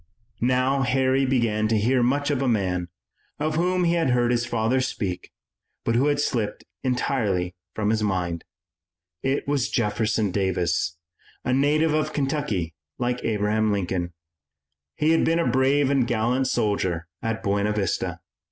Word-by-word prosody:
Now 130 +2 +2
Harry 130 +1 +2
began 115 -5 +1
to 110 0 +2
hear 125 +5 +2
much 140 +4 +1
of 140 -2 0
a 135 - +1
man, 90 -6 0 0.5
of 155 +1 0
whom 180 +3 +1
he 170 -1 +3
had 165 -4 +1
heard 120 -1 +2
his 120 0 0
father 120 +3 +1
speak, 95 -8 -3 0.6
but 115 - +1
who 125 +5 +3
had 145 -1 +1
slipped 115 -7 -1 0.2
entirely 115 -8 0 0.2
from 105 0 +1
his 110 -1 +1
mind. 90 -5 -1 0.8
It 135 +1 -1
was 140 -4 +1
Jefferson 110 -2 0
Davis, 90 -3 0 0.5
a 130 - +1
native 150 +4 +3
of 155 0 0
Kentucky 135 - -1 0.2
like 125 0 -1
Abraham 110 0 +1
Lincoln. 90 -3 -2 0.8
He 155 +1 +2
had 165 - +3
been 165 - +2
a 170 - +1
brave 130 +3 +3
and 135 -4 +2
gallant 120 +3 +1
soldier 95 -8 0 0.2
at 115 0 -3
Buena 100 0 +1
Vista. 100 -4 -2
120 Hz, 150 wpm, -24 LUFS, 105-135 Hz, 0.8 s, he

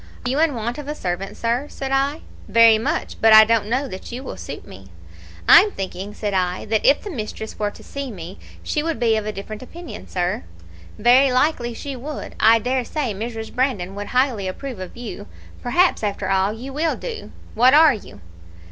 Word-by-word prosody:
"'Are - - 0
you 275 - 0
in 320 -4 +2
want 235 +4 -3
of 290 - -8
a 300 - -3
servant, 185 -3 -4
sir?' 240 +5 -1
said 270 -1 -5
I. 275 +3 +1 0.3
"'Very 225 +1 +6
much; 225 - -2
but 225 0 +7
I 220 0 +10
don't 225 -2 +1
know 260 +5 0
that 190 -2 -8
you 250 +3 -6
will - - -6
suit - - -8
me.' 95 0 -13 0.6
"'I'm 420 - +8
thinking,' 195 - -6
said 210 -2 -3
I, 180 -1 -1
'that 220 0 0
if 280 +2 +4
the 410 - -6
mistress 220 -4 -6
were 210 -1 0
to - - -14
see 280 -1 -6
me 185 -3 -9 0.2
she 300 - -1
would 325 -5 -2
be 230 -2 +3
of 215 -1 -2
a - - -1
different 210 +1 -8
opinion, 335 +6 -10
sir.' 180 - -2 0.5
"'Very 250 +5 +5
likely 250 -3 +1
she 275 +3 -6
would. 285 +4 -7
I 225 +1 +6
dare 250 +3 -1
say 255 -2 -3
Mrs. 225 +2 -6
Brandon 240 -8 -1
would 205 +1 -6
highly 250 -6 +1
approve 245 +4 -6
of 185 +4 -8
you. 225 -4 -7 0.3
Perhaps, 350 +9 +2
after 200 -2 -2
all, 190 +1 +2
you 250 +5 -8
will 315 +3 0
do. 460 -3 -7 0.2
What 250 +5 +5
are 310 -2 +7
you?' 215 - -10
230 Hz, 205 wpm, -21 LUFS, 205-275 Hz, 0.6 s, I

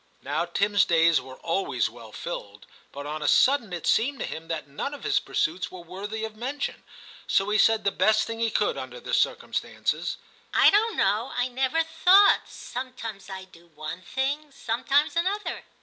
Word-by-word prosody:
' - - -37
Now 150 +5 -1
Tim*s 200 +3 +2
days 165 -1 +4
were 130 -1 -11
always 165 -8 -1
well 115 -1 -12
filled, 105 -8 -7 0.3
but 140 +1 -7
on 155 +1 -4
a 150 - -1
sudden 255 -7 +4
it 175 -2 -5
seemed 270 +5 +2
to - - -3
him 160 +1 -7
that 160 -3 -4
none 145 - -4
of - - -12
his 415 -1 +2
pursuits 180 +4 -1
were 185 - -9
worthy 205 +5 -5
of 220 -1 -8
mention, 265 +6 -4 0.4
so 195 +1 +2
he 215 - +3
said 225 -1 +4
the 200 - +2
best 215 +1 +3
thing 225 0 -5
he 230 0 +2
could - - 0
under - - -7
the - - -7
circumstances - - -1
— - - -29
* - - -35
I - - +7
don*t 430 +1 +2
know; 220 +5 +1
I 245 +1 0
never 265 +6 +1
thought; 360 +5 +5
some 255 +1 -7
times 220 -6 -8
I 190 -1 -6
do 175 -2 -18
one 155 +4 -6
thing, 280 - -2
sometimes 275 +4 0
another. 385 +5 -1
215 Hz, 195 wpm, -26 LUFS, 170-275 Hz, 0.4 s, I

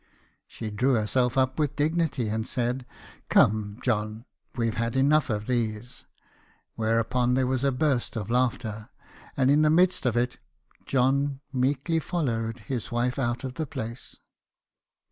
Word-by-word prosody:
She 110 -2 -6
drew 125 +5 +2
herself 125 +3 +1
up 130 +2 +1
with 150 -3 0
dignity, 150 -5 0
and 110 +1 -2
said 125 0 -2 0.4
"Come, 105 -1 +3
John, 110 -1 -1 0.3
we 115 -2 0
've 115 - -1
had 115 +1 -2
enough 145 +2 +3
of 105 -1 -2
these." 120 -1 -3 0.7
Whereupon 115 +3 +1
there 130 0 +2
was 130 0 -1
a 140 - +3
burst 135 -3 0
of 110 -1 -4
laughter, 120 -3 -1 0.5
and 135 0 +4
in 150 +2 +5
the 155 - +4
midst 175 -2 +3
of 120 -1 +1
it 125 +1 0 0.5
John 135 +1 +1
meekly 140 +5 +1
followed 120 -9 -2
his 115 +1 -4
wife 125 +2 0
out 120 -1 -1
of 130 -1 -4
the 155 +3 -4
place. 115 -1 -6
125 Hz, 150 wpm, -27 LUFS, 115-135 Hz, 0.7 s, in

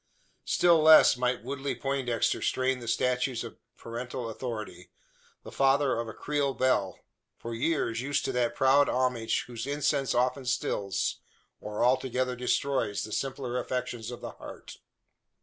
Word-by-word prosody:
Still 170 -2 +4
less 155 -3 +8
might 125 -1 -1
Woodley 140 +2 -3
Poindexter 135 -4 -1
strain 130 0 0
the 120 - -9
statutes 125 +1 0
of 115 - -10 0.2
parental 120 0 -5
authority 110 -6 -6 0.5
the - - -10
father 135 -2 +2
of 115 - -3
a 110 - -7
Creole 145 -2 -1
belle 100 -8 +1 0.4
for 115 - -6
years 115 -2 0
used 140 +1 -1
to - - -1
that 120 -2 0
proud 135 +1 +4
homage 125 -3 0
whose 120 +1 -6
incense 140 -2 0
often 125 +2 +1
stills, 105 -5 -1 0.4
or 105 +2 -2
altogether 130 0 +1
destroys, 125 -3 0
the 110 - -7
simpler 130 0 -2
affections 125 -3 -4
of 120 - -8
the - - -6
heart. - - -11
125 Hz, 145 wpm, -28 LUFS, 115-135 Hz, 0.5 s, less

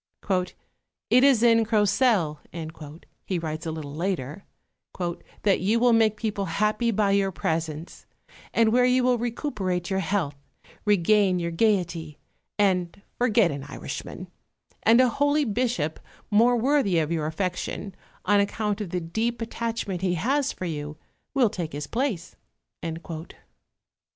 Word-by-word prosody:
"It 250 +1 +6
is 265 -5 +5
in 230 -1 +5
Crocelle," 210 - +2 0.8
he 185 - -2
writes 160 -1 -4
a - - -1
little 155 -3 -6
later, 170 0 -3 1.0
"that 200 -2 +3
you 215 +5 +2
will 245 0 +4
make 220 -2 +3
people 210 -3 -2
happy 215 +6 +1
by 210 -2 +2
your 195 -1 +2
presence, 160 -1 -3 0.4
and 225 -1 +3
where 250 +1 +5
you 250 0 +3
will 250 -1 +3
recuperate 210 -7 -2
your 190 - +1
health, 170 -5 -1 0.5
regain 205 -1 +3
your 170 -1 -2
gaiety, 170 -5 0 0.4
and 185 -3 +1 0.2
forget 225 -6 +3
an 140 -1 -5
Irishman; 145 - -7 0.6
and 230 +2 +5
a 255 - +6
holy 285 +4 +2
Bishop, 215 - -1 0.3
more 235 +4 +5
worthy 250 -7 +2
of 160 0 +1
your 155 -2 0
affection, 185 +3 -3 0.3
on 205 +1 +4
account 210 +1 -1
of 200 - -4
the 180 +1 -2
deep 220 +8 -2
attachment 230 -5 -3
he 180 -2 +1
has 270 - +1
for 185 - -6
you, 150 -2 -5 0.4
will 245 -6 +4
take 165 -4 -4
his 145 0 -4
place." 225 - -2
200 Hz, 135 wpm, -25 LUFS, 170-230 Hz, 1.0 s, It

